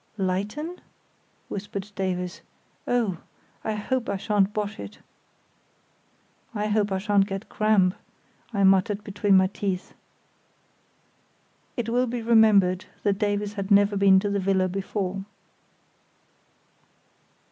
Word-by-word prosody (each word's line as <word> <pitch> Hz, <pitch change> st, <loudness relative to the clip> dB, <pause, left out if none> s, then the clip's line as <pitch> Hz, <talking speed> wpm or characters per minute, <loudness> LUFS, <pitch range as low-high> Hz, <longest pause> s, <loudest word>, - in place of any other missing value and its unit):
"Lighten?" 210 Hz, -, -3 dB, 0.7 s
whispered 200 Hz, 0 st, -6 dB
Davies; 180 Hz, -2 st, -3 dB, 0.5 s
"oh, 220 Hz, -8 st, 0 dB, 0.4 s
I 220 Hz, -, -1 dB
hope 245 Hz, +4 st, -2 dB
I 200 Hz, -, -1 dB
shan't 205 Hz, -1 st, +1 dB
bosh 210 Hz, 0 st, -3 dB
it." 100 Hz, 0 st, -8 dB, 1.6 s
"I 210 Hz, 0 st, -1 dB
hope 210 Hz, -1 st, +1 dB
I 190 Hz, -, +1 dB
shan't 200 Hz, 0 st, +2 dB
get 195 Hz, +1 st, -6 dB
cramp," 210 Hz, -4 st, +3 dB, 0.6 s
I 200 Hz, -3 st, 0 dB
muttered 195 Hz, +2 st, +3 dB
between 205 Hz, -1 st, +2 dB
my 190 Hz, -, +5 dB
teeth. 190 Hz, -1 st, -3 dB, 1.8 s
It 240 Hz, -2 st, -2 dB
will 245 Hz, +2 st, +1 dB
be 240 Hz, -1 st, -3 dB
remembered 210 Hz, -5 st, +4 dB, 0.2 s
that 200 Hz, -1 st, +1 dB
Davies 205 Hz, 0 st, -1 dB
had 200 Hz, -2 st, -4 dB
never 205 Hz, 0 st, +5 dB
been 195 Hz, -1 st, +6 dB
to 205 Hz, -, -1 dB
the 200 Hz, -, 0 dB
villa 190 Hz, -1 st, +2 dB
before. 195 Hz, 0 st, -3 dB
200 Hz, 115 wpm, -25 LUFS, 190-210 Hz, 1.8 s, been